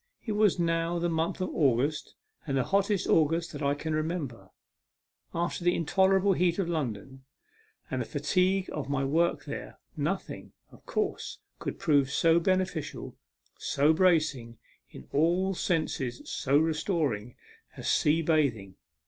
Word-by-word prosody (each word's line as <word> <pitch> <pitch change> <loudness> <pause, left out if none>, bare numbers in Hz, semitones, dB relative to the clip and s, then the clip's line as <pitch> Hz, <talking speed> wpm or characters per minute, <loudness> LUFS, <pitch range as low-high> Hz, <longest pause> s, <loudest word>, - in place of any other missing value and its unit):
It 225 - -2
was 210 -3 +3
now 165 0 0
the 170 0 0
month 165 +3 -1
of 185 - -1
August, 140 +1 +1 0.3
and 135 -2 0
the 130 - +2
hottest 200 +2 +1
August 165 +2 +2
that 145 - -7
I 140 0 +1
can 155 +2 -4
remember. 155 - -3 0.8
After 170 +1 -2
the 175 0 +3
intolerable 190 +3 +3
heat 175 -1 +1
of 195 -4 0
London, 135 -5 -4 0.7
and - - -1
the - - -3
fatigue 185 0 +1
of 145 -2 -4
my 135 -1 0
work 165 +5 +1
there, - - -7 0.2
nothing, - - -4 0.2
of - - -17
course, 425 -2 -2 0.2
could - - -4
prove 145 -4 +2
so 165 +4 +3
beneficial, 185 -3 -2 0.4
so 145 +3 +2
bracing, 155 -10 +1 0.3
in 65 - -12
all 175 +6 +2
senses 150 -9 -2
so 140 +2 +1
restoring, 155 - 0 0.4
as - - -5
sea 160 +2 +3
bathing. 125 - 0
160 Hz, 140 wpm, -29 LUFS, 140-175 Hz, 0.8 s, was